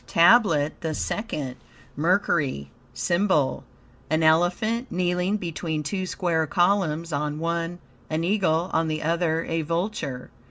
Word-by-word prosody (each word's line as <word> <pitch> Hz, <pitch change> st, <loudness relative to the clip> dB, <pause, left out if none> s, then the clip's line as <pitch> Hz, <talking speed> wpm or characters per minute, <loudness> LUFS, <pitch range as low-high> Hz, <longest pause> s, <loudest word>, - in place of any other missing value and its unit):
TABLET 165 Hz, -, +4 dB
THE 160 Hz, -2 st, -2 dB
SECOND 145 Hz, -, -3 dB, 0.4 s
Mercury 145 Hz, -, 0 dB, 0.2 s
SYMBOL 150 Hz, +4 st, +1 dB, 0.5 s
An 155 Hz, +1 st, +1 dB
elephant, 180 Hz, +10 st, +2 dB
kneeling 180 Hz, +2 st, 0 dB
between 165 Hz, -4 st, -3 dB
two 185 Hz, +4 st, -3 dB
square 165 Hz, -4 st, 0 dB
columns; 175 Hz, -2 st, +1 dB
on 150 Hz, +1 st, -1 dB
one 170 Hz, +1 st, -2 dB, 0.3 s
an 160 Hz, +1 st, -1 dB
eagle, 180 Hz, -3 st, +1 dB
on 160 Hz, 0 st, +2 dB
the 155 Hz, 0 st, -2 dB
other 165 Hz, 0 st, +1 dB
a 165 Hz, 0 st, -1 dB
vulture. 165 Hz, -5 st, -3 dB
165 Hz, 120 wpm, -25 LUFS, 155-180 Hz, 0.5 s, TABLET